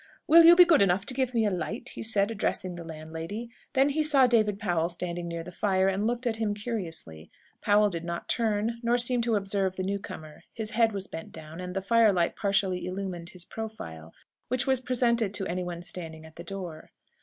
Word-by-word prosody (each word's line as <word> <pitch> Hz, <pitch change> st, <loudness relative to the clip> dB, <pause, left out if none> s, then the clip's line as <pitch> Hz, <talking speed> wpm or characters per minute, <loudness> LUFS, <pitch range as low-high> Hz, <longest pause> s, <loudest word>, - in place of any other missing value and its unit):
"Will 335 Hz, +2 st, +8 dB
you 340 Hz, +1 st, +10 dB
be 360 Hz, 0 st, +9 dB
good 335 Hz, -7 st, +5 dB
enough 195 Hz, 0 st, +3 dB
to -, -, +2 dB
give 255 Hz, -1 st, -1 dB
me 225 Hz, -1 st, +3 dB
a 205 Hz, -, +1 dB
light?" 200 Hz, +7 st, -4 dB
he -, -, -8 dB
said, 210 Hz, -1 st, +2 dB
addressing 190 Hz, -4 st, -2 dB
the 175 Hz, -1 st, -7 dB
landlady. 165 Hz, +8 st, -7 dB, 0.2 s
Then 270 Hz, +1 st, +4 dB
he 300 Hz, +2 st, 0 dB
saw 290 Hz, -4 st, +5 dB
David 215 Hz, -4 st, +2 dB
Powell 175 Hz, -6 st, 0 dB
standing 175 Hz, 0 st, -3 dB
near 170 Hz, -1 st, -4 dB
the 180 Hz, -, -9 dB
fire, 190 Hz, 0 st, +1 dB
and 195 Hz, +3 st, 0 dB
looked 240 Hz, +1 st, -2 dB
at 225 Hz, -2 st, 0 dB
him 215 Hz, -2 st, -1 dB
curiously. 165 Hz, -, -6 dB, 0.3 s
Powell 210 Hz, 0 st, +4 dB
did 170 Hz, -2 st, -4 dB
not 170 Hz, 0 st, -5 dB
turn, 225 Hz, 0 st, 0 dB
nor 240 Hz, 0 st, +2 dB
seem 245 Hz, 0 st, +2 dB
to 230 Hz, -1 st, +1 dB
observe 195 Hz, -2 st, 0 dB
the 185 Hz, -, -3 dB
new 200 Hz, +1 st, -1 dB
comer. 155 Hz, -5 st, -10 dB
His 220 Hz, -2 st, -4 dB
head 225 Hz, 0 st, +3 dB
was 195 Hz, -2 st, -4 dB
bent 165 Hz, -4 st, -8 dB
down, 160 Hz, +2 st, -9 dB
and 180 Hz, 0 st, -6 dB
the 195 Hz, -, -2 dB
firelight 200 Hz, -5 st, +3 dB
partially 195 Hz, -3 st, 0 dB
illumined 185 Hz, -2 st, -5 dB
his 180 Hz, -1 st, -8 dB
profile, 85 Hz, -, -8 dB, 0.4 s
which 255 Hz, +1 st, 0 dB
was 265 Hz, -2 st, +2 dB
presented 235 Hz, -4 st, +1 dB
to 195 Hz, -, -1 dB
anyone 175 Hz, -1 st, -4 dB
standing 160 Hz, -3 st, -7 dB
at 160 Hz, -, -15 dB
the 170 Hz, -, -8 dB
door. 175 Hz, -4 st, -7 dB
200 Hz, 210 wpm, -28 LUFS, 175-230 Hz, 0.4 s, you